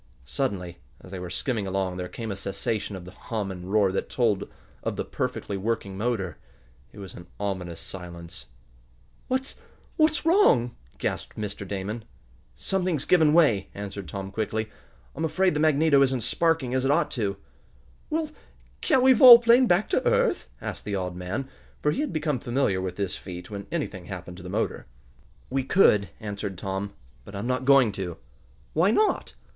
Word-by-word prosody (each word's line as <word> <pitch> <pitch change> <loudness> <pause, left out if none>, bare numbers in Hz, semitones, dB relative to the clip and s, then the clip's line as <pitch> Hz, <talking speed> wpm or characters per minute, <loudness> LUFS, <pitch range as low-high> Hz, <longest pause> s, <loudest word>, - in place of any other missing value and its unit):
Suddenly, 90 - -3 0.2
as 90 - -13
they 95 - -5
were 90 -1 -6
skimming 105 +3 -2
along, 95 -1 -1
there 90 0 -4
came 115 +3 -6
a - - -3
cessation 100 +2 -3
of 90 -2 -8
the 90 - -10
hum 105 0 -4
and 90 0 -7
roar 100 -3 +4
that 95 - -2
told 105 -5 0 0.3
of - - -2
the - - -3
perfectly 100 - -3
working 100 -1 -2
motor. 100 -6 -2 0.5
It - - -16
was 95 -2 -8
an 85 - -11
ominous 95 -4 -3
silence. 85 -7 -9 0.8
"What's 260 +1 -2 0.4
what's 310 0 +3
wrong?" 325 - +4 0.2
gasped - - -3
Mr. 100 -2 -5
Damon. 100 +4 -4 0.5
"Something's 180 -7 -1
given 160 -4 +5
way," 145 - +4
answered 100 -2 -6
Tom 95 +4 -6
quickly. 110 +1 -2 0.4
"I'm - - -3
afraid 185 +3 +2
the 150 - -1
magneto 155 -2 +4
isn't 130 -2 +2
sparking 165 -3 +1
as 130 0 +1
it 135 - +1
ought 150 +2 +2
to." 100 -5 -1 0.7
"Well, 315 -1 -1 0.5
can't 260 - +3
we 260 0 +8
volplane 240 0 +9
back 180 +2 +3
to - - +1
earth?" - - +1
asked - - -5
the 100 -1 -3
odd 90 -2 -3
man, 95 +10 -4 0.4
for 150 - +3
he 275 - -1
had 300 - -2
become 150 -4 -1
familiar 120 -7 0
with 95 -1 -4
this 100 -3 -2
feat 90 +1 -9
when 100 -1 -6
anything 105 - -3
happened 90 -2 -8
to - - -10
the 90 - -8
motor. 105 - -2 0.6
"We 135 0 0
could," 105 - +4
answered 100 -2 -5
Tom, 95 +2 -4 0.3
"but 100 - -11
I'm 100 +3 -4
not 130 +1 -1
going 135 -5 +6
to." 95 -4 -5 0.6
"Why 165 +5 +4
not?" 420 - +1
105 Hz, 175 wpm, -26 LUFS, 95-150 Hz, 0.8 s, volplane